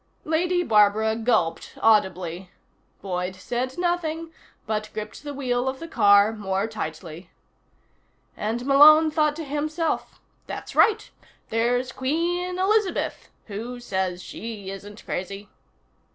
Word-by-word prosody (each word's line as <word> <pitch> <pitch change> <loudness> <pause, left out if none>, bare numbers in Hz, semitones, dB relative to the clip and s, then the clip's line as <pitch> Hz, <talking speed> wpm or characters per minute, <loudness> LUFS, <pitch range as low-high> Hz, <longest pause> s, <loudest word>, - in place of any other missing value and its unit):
Lady 355 +3 +1
Barbara 220 -2 +3
gulped 220 -8 0
audibly. 185 -4 +1 0.5
Boyd 180 -1 -3
said 245 +7 -3
nothing, 330 -2 -2 0.3
but 215 0 -2
gripped 215 0 -6
the 290 - -5
wheel 255 -2 -1
of 265 - -5
the 330 - -7
car 205 -6 +5
more 195 -2 -2
tightly. 170 -5 -7 1.1
And 230 +4 -3
Malone 305 +3 +7
thought 300 -1 +2
to 325 - -5
himself: 305 +3 -2 0.3
_That's - - -6
right. 440 -1 +4 0.4
There's 245 +3 0
Queen 345 +8 -1
Elizabeth 395 +1 0 0.2
who 230 +4 -6
says 190 -5 -2
she 210 -4 -7
isn't 205 +2 -10
crazy. 195 +3 -5
230 Hz, 115 wpm, -24 LUFS, 200-310 Hz, 1.1 s, Malone